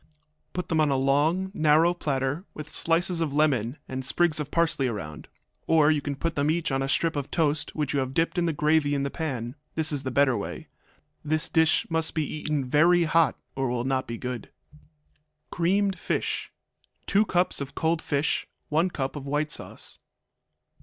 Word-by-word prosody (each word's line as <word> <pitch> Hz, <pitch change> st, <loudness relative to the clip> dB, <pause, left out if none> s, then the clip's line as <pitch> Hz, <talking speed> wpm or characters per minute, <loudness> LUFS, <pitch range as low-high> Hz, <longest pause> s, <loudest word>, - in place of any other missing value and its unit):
Put 180 Hz, -1 st, -4 dB
them 160 Hz, -2 st, +2 dB
on 150 Hz, -, +3 dB
a 140 Hz, -, +2 dB
long, 150 Hz, +8 st, +1 dB
narrow 155 Hz, +3 st, +4 dB
platter, 140 Hz, -1 st, -2 dB
with 155 Hz, -1 st, -8 dB
slices 170 Hz, +1 st, +1 dB
of 150 Hz, -3 st, -1 dB
lemon 135 Hz, -4 st, +1 dB
and 130 Hz, 0 st, -4 dB
sprigs 160 Hz, +3 st, +1 dB
of 150 Hz, -1 st, -4 dB
parsley 160 Hz, -5 st, +1 dB
around. 75 Hz, -10 st, -6 dB, 0.4 s
Or 155 Hz, -2 st, +5 dB
you 150 Hz, -2 st, +1 dB
can 140 Hz, 0 st, -3 dB
put 165 Hz, +1 st, -2 dB
each 165 Hz, -1 st, 0 dB
one 135 Hz, 0 st, 0 dB
on -, -, 0 dB
a 135 Hz, -, -3 dB
strip 165 Hz, +3 st, +1 dB
of 140 Hz, -1 st, -3 dB
toast 150 Hz, -3 st, +1 dB
which 150 Hz, -3 st, -1 dB
you 140 Hz, -, +1 dB
have 130 Hz, 0 st, -3 dB
dipped 165 Hz, +2 st, +1 dB
in 170 Hz, -, +1 dB
the -, -, +2 dB
gravy 150 Hz, -1 st, +2 dB
in 140 Hz, -, 0 dB
the 140 Hz, -, -2 dB
pan; 125 Hz, -7 st, -4 dB, 0.2 s
this 160 Hz, 0 st, +3 dB
is 145 Hz, -2 st, +1 dB
the 130 Hz, -, -3 dB
better 130 Hz, 0 st, +3 dB
way. 100 Hz, -, -6 dB, 0.5 s
This 155 Hz, +1 st, 0 dB
dish 160 Hz, -1 st, +3 dB
must 165 Hz, -1 st, -1 dB
be 155 Hz, -2 st, +1 dB
eaten 150 Hz, -2 st, -2 dB
very 170 Hz, +6 st, +4 dB
hot, 165 Hz, -1 st, +3 dB, 0.2 s
or 135 Hz, 0 st, 0 dB
it -, -, -1 dB
will 120 Hz, -1 st, -1 dB
not 130 Hz, -1 st, 0 dB
be 115 Hz, -, -5 dB
good. 125 Hz, -3 st, -5 dB, 1.0 s
Creamed 190 Hz, +3 st, +1 dB
Fish -, -, -2 dB, 0.5 s
2 200 Hz, +2 st, +3 dB
cups 180 Hz, -3 st, +1 dB
of 140 Hz, -1 st, -6 dB
cold 160 Hz, 0 st, 0 dB
fish. 145 Hz, 0 st, -1 dB, 0.2 s
1 160 Hz, +5 st, +2 dB
cup 135 Hz, -5 st, -3 dB
of 140 Hz, -1 st, -6 dB
white 150 Hz, +2 st, -1 dB
sauce. -, -, -5 dB
150 Hz, 195 wpm, -26 LUFS, 135-165 Hz, 1.0 s, Or